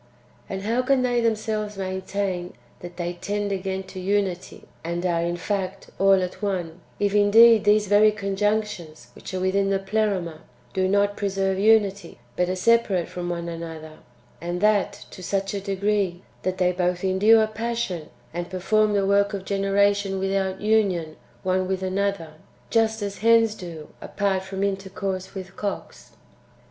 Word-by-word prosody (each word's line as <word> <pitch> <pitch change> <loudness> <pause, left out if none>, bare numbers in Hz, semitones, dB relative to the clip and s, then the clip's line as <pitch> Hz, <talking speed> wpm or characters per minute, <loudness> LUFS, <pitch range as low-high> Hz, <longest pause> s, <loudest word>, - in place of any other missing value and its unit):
And 190 0 -4
how 230 +4 +1
can 255 0 +2
they 245 -1 +1
themselves 215 -2 -1
main 190 -1 -3
tain 185 -2 -3 0.3
that 175 0 -10
they 175 0 -2
tend 205 +1 -2
again 190 0 -2
to 190 0 -9
unity, 185 -1 -2 0.2
and 170 +2 -3
are, 170 -2 +1
in 170 +1 -1
fact, 190 0 -4
all 195 -1 +5
at 180 +3 -6
one, 180 -4 -3 0.2
if 205 -1 +1
indeed 215 +2 +6
these 210 0 +4
very 205 +2 +5
conjunctions, 200 - -2
which - - -10
are 185 - -3
within 195 +1 +1
tlie 195 0 -1
Pleroma, 195 -7 -1 0.3
do 185 -1 +1
not 205 +1 +2
preserve 195 -1 -1
unity, 205 -2 +2 0.2
but 180 0 +1
are 185 - -1
separate 200 -3 +2
from 175 -1 -5
one 170 -1 -3
another; 160 -2 -7 0.4
and 175 +1 -3
that 205 0 +1
to 185 - -10
such 195 +2 -2
a 200 - -3
degree, 195 -2 -1 0.2
that 185 0 -2
they 180 -1 +2
both 180 0 -1
endure 210 +4 +5
passion 215 -6 -3 0.2
and 175 0 -4
perform 210 +3 +1
the 200 -1 +2
work 200 +1 +2
of 190 -1 -6
generation 200 0 +1
without 190 0 -1
union 195 -7 +1 0.3
one 185 0 +1
with 190 0 -2
another, 190 -3 -1 0.4
just 225 -1 +2
as 200 -1 -5
hens 225 0 +4
do 170 -7 -9
apart 195 -2 -1
from 190 +1 -4
intercourse 190 -1 -3
with 190 0 -8
cocks? 205 -1 -6
195 Hz, 160 wpm, -24 LUFS, 185-205 Hz, 0.4 s, indeed